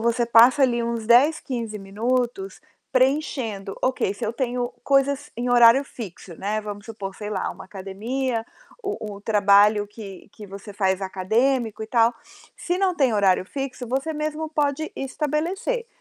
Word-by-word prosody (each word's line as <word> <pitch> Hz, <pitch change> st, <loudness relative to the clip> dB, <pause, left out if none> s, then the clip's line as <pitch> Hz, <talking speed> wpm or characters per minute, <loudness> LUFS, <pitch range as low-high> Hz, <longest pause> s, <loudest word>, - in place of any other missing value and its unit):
você 235 Hz, +1 st, +1 dB
passa 240 Hz, +4 st, +6 dB
ali 240 Hz, -2 st, +3 dB
uns 230 Hz, -2 st, -3 dB
10, 280 Hz, +7 st, +5 dB
15 230 Hz, -5 st, -4 dB
minutos 245 Hz, -, -2 dB, 0.3 s
preenchendo. 255 Hz, -7 st, 0 dB
"Ok, 255 Hz, -6 st, 0 dB
se -, -, -14 dB
eu 220 Hz, -, -1 dB
tenho 245 Hz, 0 st, -2 dB
coisas 280 Hz, +1 st, +1 dB
em 245 Hz, +1 st, -2 dB
horário 240 Hz, +2 st, +7 dB
fixo", 190 Hz, -8 st, -9 dB
né, 210 Hz, +2 st, -1 dB
vamos 205 Hz, 0 st, -8 dB
supor, 205 Hz, -4 st, -6 dB
sei 210 Hz, +1 st, -7 dB
lá, 195 Hz, -3 st, -2 dB
uma -, -, -10 dB
academia, 225 Hz, +6 st, -3 dB, 0.4 s
o 210 Hz, -2 st, -4 dB
o 200 Hz, -, -12 dB
trabalho 205 Hz, 0 st, +4 dB
que 205 Hz, -2 st, -11 dB
que 210 Hz, -, -10 dB
você 200 Hz, +2 st, -10 dB
faz 190 Hz, -1 st, 0 dB
acadêmico 220 Hz, +5 st, 0 dB
e -, -, -5 dB
tal. 230 Hz, 0 st, +3 dB, 0.4 s
Se 355 Hz, +1 st, -2 dB
não 380 Hz, -2 st, +2 dB
tem 270 Hz, -8 st, +2 dB
horário 195 Hz, -3 st, +3 dB
fixo, 265 Hz, +2 st, -5 dB
você 270 Hz, +6 st, -1 dB
mesmo 305 Hz, +1 st, -3 dB
pode 300 Hz, 0 st, -1 dB
estabelecer. 325 Hz, -, -2 dB
235 Hz, 155 wpm, -23 LUFS, 205-270 Hz, 0.4 s, horário